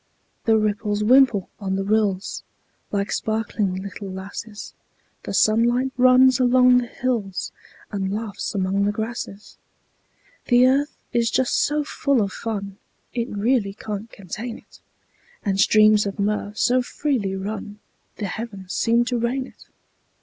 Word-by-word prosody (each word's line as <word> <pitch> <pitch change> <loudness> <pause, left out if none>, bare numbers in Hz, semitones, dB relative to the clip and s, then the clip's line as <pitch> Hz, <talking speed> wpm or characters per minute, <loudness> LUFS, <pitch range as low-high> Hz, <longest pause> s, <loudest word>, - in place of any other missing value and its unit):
The 225 -1 +4
ripples 210 0 0
wimple 240 -4 +5
on 190 -2 -2
the 195 - -1
rills, 200 -2 0 0.5
Like 200 0 -1
sparkling 215 -3 -1
little 195 +1 -6
lasses; 200 +3 -8 0.5
The - - -4
sunlight 240 +4 +3
runs 255 0 +5
along 250 0 +5
the 245 - -4
hills, 230 -7 -2 0.4
And 195 -2 -2
laughs 210 -1 -4
among 195 +1 +1
the 205 - +2
grasses. 220 -2 -6 0.9
The 245 0 +5
earth 275 +3 +2 0.2
is 235 -1 +2
just 260 +1 +1
so 295 +1 +1
full 280 -4 +1
of 195 - -4
fun 200 -3 -5 0.4
It 235 -1 -2
really 205 -1 0
can't 210 +1 -6
contain 215 +5 -6
it; - - -19 0.6
And 195 -1 0
streams 215 0 +5
of 195 - -5
mirth 210 0 -2
so 255 +1 +3
freely 245 -7 -2
run 205 +1 -5 0.4
The 210 - -4
heavens 195 -2 -6
seem 235 +1 +2
to 245 -1 -1
rain 250 +3 -1
it. - - -17
215 Hz, 140 wpm, -23 LUFS, 200-245 Hz, 0.9 s, wimple